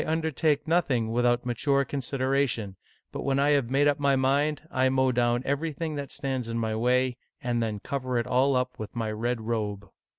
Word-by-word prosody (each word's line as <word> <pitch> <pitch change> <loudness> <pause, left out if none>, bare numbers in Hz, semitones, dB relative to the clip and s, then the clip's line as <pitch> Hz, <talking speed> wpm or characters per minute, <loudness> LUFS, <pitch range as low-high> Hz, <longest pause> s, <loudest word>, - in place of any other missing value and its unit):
undertake 160 -2 0
nothing 135 -9 +1
without 120 +1 +2
mature 140 +3 +1
consideration, 130 -6 -1 0.4
but - - -5
when 135 0 0
I 140 +1 +3
have 140 -5 +2
made 140 +2 +3
up 145 0 +2
my 140 -1 +3
mind, 140 +3 +1
I 130 -3 +2
mow 130 0 +2
down 120 0 +1
everything 155 +2 -2
that 140 -2 -5
stands 130 -4 -3
in 115 - -2
my 110 -1 -1
way, 125 +2 +1 0.2
and 120 -1 -1
then 110 -2 -2
cover 130 +1 -3
it 120 - 0
all 130 +2 +2
up 125 0 -1
with 110 +1 -7
my 110 -2 -2
red 115 +2 -2
robe." 105 -3 -3
130 Hz, 190 wpm, -27 LUFS, 120-140 Hz, 0.4 s, I